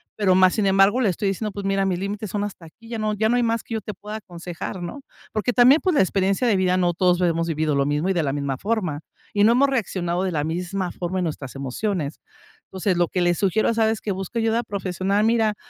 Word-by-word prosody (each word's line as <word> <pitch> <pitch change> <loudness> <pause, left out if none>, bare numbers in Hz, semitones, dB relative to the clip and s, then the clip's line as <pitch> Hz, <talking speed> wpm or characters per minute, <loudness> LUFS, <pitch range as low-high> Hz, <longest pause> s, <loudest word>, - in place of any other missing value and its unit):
pero, 190 -3 +3
más 185 0 +5
sin 210 -3 +1
embargo, 195 +5 +4
le 220 - +3
estoy 195 +3 -1
diciendo: 210 +2 -3
"Pues, 200 0 -6
mira, 195 0 +1
mis 180 - 0
límites 200 +2 -4
son 205 +1 -2
hasta 200 -4 -7
aquí, 225 +8 -16
ya 230 -1 -4
no 215 0 0
ya 220 +1 +1
no 240 - +3
hay - - +2
más 230 -1 0
que - - -8
yo 220 - -2
te 210 - -7
pueda 210 +1 -7
aconsejar", 175 -2 -7
¿no? 175 +11 -6 0.3
Porque 220 +3 -1
también, 255 +6 +6
pues, 370 -4 +1
la - - +5
experiencia 195 +5 +1
de 220 - +3
vida 185 -1 +2
no 175 -1 +2
todos 180 0 +2
lo 180 - +2
hemos 165 -1 0
vivido 155 -2 0
lo 140 0 +2
mismo, 150 +5 0
y - - +2
de 175 - +1
la 140 - 0
misma 140 -2 -2
forma, 190 - -1 0.3
y 205 - +3
no 225 +3 +6
hemos 275 +3 +4
reaccionado 185 -8 -1
de 190 - -1
la 150 -3 -1
misma 180 +3 -3
forma 180 +1 -4
en - - 0
nuestras 145 -5 -5
emociones. 145 - -3 0.5
Entonces, 190 0 -1
lo 175 0 +3
que 180 - -2
le 175 0 +3
sugiero 195 +4 +1
es: 230 - 0
"¿Sabes 220 -1 +2
qué? 210 - -2
Busca 195 +4 -5
ayuda 225 +1 +1
profesional". 195 -1 -1
Mira, 225 -2 +2
195 Hz, 260 wpm, -23 LUFS, 175-215 Hz, 0.5 s, también